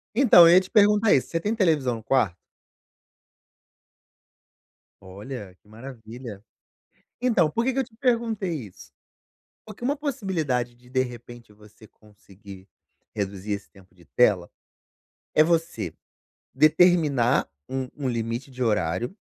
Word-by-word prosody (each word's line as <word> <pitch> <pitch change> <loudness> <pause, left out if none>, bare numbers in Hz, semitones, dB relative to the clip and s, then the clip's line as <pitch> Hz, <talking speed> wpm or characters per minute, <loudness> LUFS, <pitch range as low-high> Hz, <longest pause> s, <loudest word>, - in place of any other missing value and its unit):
Então, 215 -10 +7
eu 170 - +6
ia 185 - +8
te 185 - -11
perguntar 210 0 +4
isso: 130 - +2
você 165 - -1
tem 210 +6 -2
televisão 155 - +1
no 110 - -10
quarto? 115 -9 +1 2.7
Olha, 100 +1 -9
que - - -29
maravilha. 115 -2 -10 0.8
Então, 205 -11 +2
por 230 +8 -1
que 260 0 0
que 270 - -1
eu - - +1
te 225 -2 -18
perguntei 220 - -1
isso? 90 - -16 0.7
Porque 215 +2 -13
uma 285 +3 0
possibilidade 170 - -2
de, 125 +1 -22
de 130 0 +1
repente 120 -2 -10
você 105 +1 -18
conseguir 100 -2 -16 0.5
reduzir 100 0 -4
esse 100 0 -6
tempo 95 -3 -21
de 85 -2 -21
tela, 95 -8 +2 0.8
é 155 - +6
você 160 - -1 0.6
determinar 155 -6 +3 0.2
um 130 -1 -4
um 140 -3 -3
limite 115 +3 -4
de 130 -1 -6
horário 105 - -1
130 Hz, 135 wpm, -24 LUFS, 105-180 Hz, 2.7 s, ia